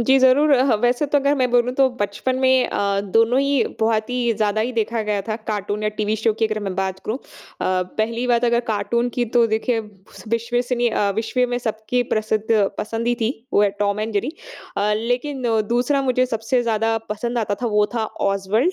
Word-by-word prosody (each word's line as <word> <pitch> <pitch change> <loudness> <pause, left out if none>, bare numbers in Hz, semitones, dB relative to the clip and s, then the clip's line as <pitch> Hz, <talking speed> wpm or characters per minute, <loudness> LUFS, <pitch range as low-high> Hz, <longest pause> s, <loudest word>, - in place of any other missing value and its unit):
जी, 265 +3 +4
ज़रूर 265 +4 +4
अ, 255 -2 +5
ह 245 - +3
वैसे 245 +4 +2
तो 290 +1 +2
अगर 280 +1 +2
मैं 255 -2 +1
बोलूँ 245 0 +2
तो 270 -1 +4
बचपन 205 +6 -1
में 260 -1 +3
अ, 200 0 0
दोनों 225 +5 +2
ही 275 -2 +2 0.2
बहुत 220 -1 +1
ही 245 -2 +1
ज़्यादा 215 0 0
ही 245 +3 -1
देखा 230 -1 -1
गया 210 -1 -1
था 215 - -1
कार्टून 210 0 -3
या 215 - +1
टीवी 215 0 0
शो 220 +1 +1
की 225 - +4
अगर 215 0 -3
मैं 195 -2 -4
बात 190 -1 -2
करूँ। 220 - -2
अ, - - -27 0.4
पहली 215 +6 -1
बात 240 -1 +2
अगर 235 0 +3
कार्टून 220 +3 0
की 245 - +1
तो 235 -1 +5
देखिए 225 +2 0 0.5
विश्वसनीय 240 +1 0
अ, 205 -2 +1
विश्व 225 +3 -1
में 245 - 0
सब 225 -3 -3
की 250 0 +2
प्रसिद्ध 215 0 0 0.3
पसंद 225 +2 -3
ही 240 - +2
थी, 225 0 +1 0.2
वो 205 - +4
है 205 - +3
टॉम 205 0 +1
एंड 220 +1 -3
जेरी। 210 +8 -1 0.4
अ, 210 +1 +1
लेकिन 245 +5 -2 0.3
दूसरा 250 +4 +1
मुझे 255 -1 +2
सबसे 230 +1 0
ज़्यादा 225 -1 +1
पसंद 235 +3 -2
आता 205 -2 0
था, - - +1
वो 210 -2 +2
था 225 -2 0 0.3
ओसवाल्ड। 200 - +1
230 Hz, 210 wpm, -21 LUFS, 215-250 Hz, 0.5 s, अ